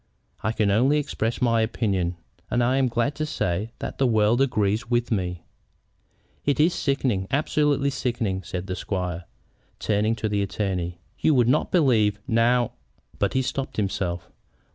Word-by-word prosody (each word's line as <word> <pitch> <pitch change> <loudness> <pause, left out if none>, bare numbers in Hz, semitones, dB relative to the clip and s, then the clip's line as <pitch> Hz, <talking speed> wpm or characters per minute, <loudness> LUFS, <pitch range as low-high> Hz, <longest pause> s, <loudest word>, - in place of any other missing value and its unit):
"I 110 - 0
can 105 -3 +1
only 130 +8 +3
express 120 -5 -2
my 115 -2 +3
opinion, 95 -6 0 0.3
and 120 - +2
am 130 +2 +3
glad 120 +4 0
to 155 - -1
say 95 -4 -1
that - - -6
the 135 - +4
world 110 +2 +3
agrees 110 -3 +1
with 120 -1 +1
me." 90 -5 -1 1.0
"It 145 0 +1
is 165 +4 +4
sickening, 130 - 0
absolutely 145 -1 +1
sickening," 115 -8 -1
said 90 0 -5
the 95 -1 -3
squire, 90 -2 -3 0.5
turning 110 +1 +1
to 110 - -2
the 105 -1 0
attorney. 95 -3 -2 0.2
"You 155 - +3
would 120 -2 +4
not 140 +5 +2
believe, 110 - +3
now 120 +1 +3 0.2
" - - -29
But 100 - +1
he 130 - +2
stopped 135 +1 -3
himself. 95 -4 -2
110 Hz, 160 wpm, -25 LUFS, 100-130 Hz, 1.0 s, the